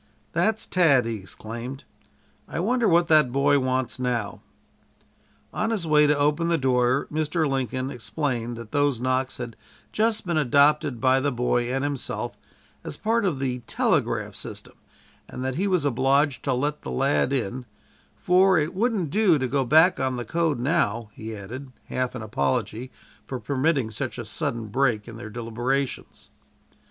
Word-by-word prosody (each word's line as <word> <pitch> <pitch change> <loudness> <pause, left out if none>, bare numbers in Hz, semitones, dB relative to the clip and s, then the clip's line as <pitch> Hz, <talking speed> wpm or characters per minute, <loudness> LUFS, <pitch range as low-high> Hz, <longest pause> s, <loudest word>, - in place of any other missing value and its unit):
"That's 220 0 +1
Tad," 145 -9 +4
he 115 -1 -2
exclaimed, 115 +7 -7 0.6
"I - - -4
wonder 235 +5 +2
what 170 0 +4
that 155 -6 +5
boy 140 +2 +3
wants 130 -1 -1
now." 120 -5 -2 1.1
On 220 - -1
his 215 -7 -1
way 150 -1 +5
to 150 0 +3
open 150 +3 +1
the 170 -1 +2
door, 130 -1 +2
Mr. 155 +1 0
Lincoln 130 -1 -2
explained 120 -2 -3
that 115 -2 -9
those 145 -4 +1
knocks 130 +1 -1
had 120 -2 -6 0.4
just 220 -1 0
been 170 -3 0
adopted 145 -1 +3
by 130 +1 +4
the 140 +1 0
boy 120 0 0
and 135 +1 -1
himself, 145 -2 -3 0.5
as - - -6
part 225 0 +1
of 170 -7 0
the 130 -2 -2
telegraph - - 0
system, - - -8 0.6
and 130 - -5
that 130 +1 -2
he 195 +3 +1
was 180 -6 +1
obliged 135 +1 +2
to 135 - +1
let 145 +4 -1
the - - -7
lad 135 0 +1
in 125 -1 -2 0.5
"for 185 +1 +4
it 155 +1 0
wouldn't 200 - 0
do 200 -5 +4
to 130 -2 -1
go 135 +1 +1
back 160 +8 +5
on 130 -1 0
the 120 -1 -4
code 165 +2 0
now," 120 -6 0
he 110 0 -7
added, 125 +7 -8 0.2
half 130 0 -2
in 120 - -5
apology 120 +1 -1 0.3
for 130 - -5
permitting 135 0 0
such 125 +4 -4
a 120 - -5
sudden 120 -1 -3
break 110 -1 0
in 115 -1 -9
their 110 -2 -8
deliberations. 120 +4 -3
135 Hz, 165 wpm, -25 LUFS, 120-155 Hz, 1.1 s, that